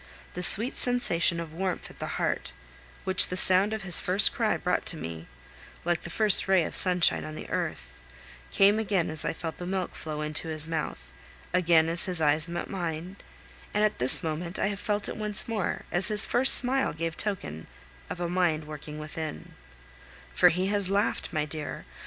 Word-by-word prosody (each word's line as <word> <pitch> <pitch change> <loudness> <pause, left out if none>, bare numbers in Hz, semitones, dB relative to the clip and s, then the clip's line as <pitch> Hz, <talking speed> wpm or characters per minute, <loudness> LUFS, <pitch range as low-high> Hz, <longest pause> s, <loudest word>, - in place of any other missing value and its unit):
The 180 - -5
sweet 220 +8 +1
sensation 175 -9 +1
of 165 -2 -7
warmth 185 +1 -4
at - - -19
the - - -5
heart, - - -2 0.5
which 190 0 +5
the 180 - -4
sound 190 +3 +3
of 220 -2 -4
his 175 -3 +6
first 195 +3 +3
cry 225 -3 0
brought 180 - -1
to 165 - 0
me 80 - -7 0.6
like 175 -1 0
the - - -8
first 210 +3 +2
ray 190 -3 +4
of - - -6
sunshine 180 -2 +3
on 155 - -7
the - - -8
earth - - -4 0.6
came 200 +2 +3
again 195 -7 -1
as 155 -1 -7
I - - 0
felt 165 -1 -7
the 175 - -7
milk 185 -1 -3
flow 155 -1 -6
into 150 +2 -2
his 155 0 0
mouth, 160 -1 -5 0.4
again 170 -3 +3
as 170 +1 +3
his 180 -3 -3
eyes 155 +1 +2
met 175 - -4
mine, 175 0 -5 0.6
and 210 - +2
at 215 -8 0
this 125 +8 +5
moment 165 +2 -4
I - - 0
have 200 -1 -5
felt 205 0 -2
it - - -6
once 210 -2 -1
more 215 -5 -3
as 175 +2 +3
his 210 0 +4
first 260 +3 +7
smile 265 +1 +3
gave 165 +1 -4
token 80 - -4 0.4
of - - -6
a 175 - -2
mind 170 -3 0
working 150 0 -9
within 155 - -7 0.8
for 180 - +5
he 180 +3 -1
has 200 -2 0
laughed, 200 0 -1
my 155 -3 -1
dear! 150 0 -7
175 Hz, 195 wpm, -27 LUFS, 160-200 Hz, 0.8 s, first